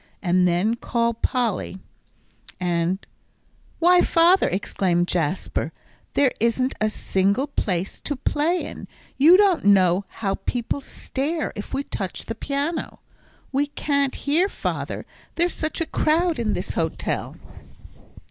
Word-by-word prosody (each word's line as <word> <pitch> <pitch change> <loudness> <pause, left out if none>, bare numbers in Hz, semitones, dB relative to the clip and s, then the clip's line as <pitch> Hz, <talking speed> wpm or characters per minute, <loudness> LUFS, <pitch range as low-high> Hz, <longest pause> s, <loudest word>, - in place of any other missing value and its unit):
And 180 0 +3
then 180 +6 +2
call 235 0 0
Polly, 230 -5 -1 0.8
and 175 +1 0 0.4
" - - -43 0.3
"Why, 355 +1 +5
father," 345 +3 +4
exclaimed 175 -2 0
Jasper, 175 0 -1 0.4
"there 275 -3 +4
isn't 255 +3 +1
a 215 - +3
single 200 +4 +1
place 190 -10 -2
to 290 - -1
play 300 +6 0
in. - - -8 0.3
You 330 +6 +8
don't 395 -4 +4
know 190 -1 +4
how 195 -3 -3
people 245 +3 -1
stare 290 +4 -3
if 205 - -7
we 275 - -1
touch 190 -8 -5
the 225 - -4
piano. 285 +7 -3 0.5
We 280 +2 +1
can't 280 -2 0
here, 330 +7 +1
father; - - -4 0.3
there's 345 +1 +1
such 315 +1 -3
a - - +1
crowd 320 0 +1
in 220 -3 0
this - - -3
hotel." - - -2
250 Hz, 130 wpm, -23 LUFS, 195-305 Hz, 0.8 s, You